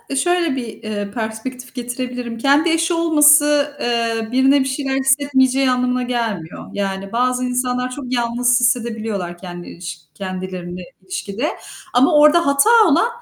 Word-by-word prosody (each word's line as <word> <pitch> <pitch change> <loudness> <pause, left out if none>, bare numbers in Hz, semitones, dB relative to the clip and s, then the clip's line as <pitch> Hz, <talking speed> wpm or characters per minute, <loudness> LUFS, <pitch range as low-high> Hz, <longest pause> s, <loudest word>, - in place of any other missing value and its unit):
şöyle 345 -1 +1
bir, 245 -3 -4 0.2
eee, 205 -2 -4
perspektif 245 +3 -6
getirebilirim: 245 -1 -5
Kendi 285 +7 +3
eşi 330 +1 +1
olması, 295 -3 +4
eee, 230 -2 -1
birine 265 +2 +4
bir 265 - 0
şeyler 270 0 -2
hissetmeyeceği 270 -1 +2
anlamına 250 0 0
gelmiyor. 225 -9 -4
Yani 195 -1 -4
bazı 250 +1 0
insanlar 250 0 -1
çok 255 -1 -6
yalnız 240 0 +1
hissedebiliyorlar 225 -7 -1
kendi 175 -1 -9
iliş 170 -2 -8 0.2
kendilerini 185 -2 -6 0.2
ilişkide. 265 - -4 0.5
Ama 250 +2 +4
orada 300 +3 +5
hata 280 +10 +3 0.2
olan, 335 +7 +3
250 Hz, 130 wpm, -19 LUFS, 220-280 Hz, 0.5 s, orada